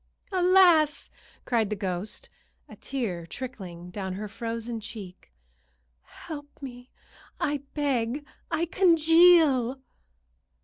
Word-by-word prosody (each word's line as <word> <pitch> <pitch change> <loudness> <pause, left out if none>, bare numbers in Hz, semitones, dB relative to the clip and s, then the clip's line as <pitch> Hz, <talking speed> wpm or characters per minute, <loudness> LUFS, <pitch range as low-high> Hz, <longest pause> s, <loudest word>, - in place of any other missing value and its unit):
"Alas!" 360 -5 +4 0.3
cried 225 -4 +1
the 210 - -1
ghost, 190 0 -4 0.4
a - - -12
tear 195 -11 -4
trickling 180 -7 -8
down 190 -1 -4
her 210 +3 -5
frozen 230 +2 -5
cheek. 205 - -10 0.7
"Help 290 - -10
me, 245 -2 -9 0.5
I 290 0 0 0.2
beg. 275 -1 -1 0.2
I 325 +1 0
congeal!" 325 -7 +5
250 Hz, 95 wpm, -27 LUFS, 210-310 Hz, 0.7 s, congeal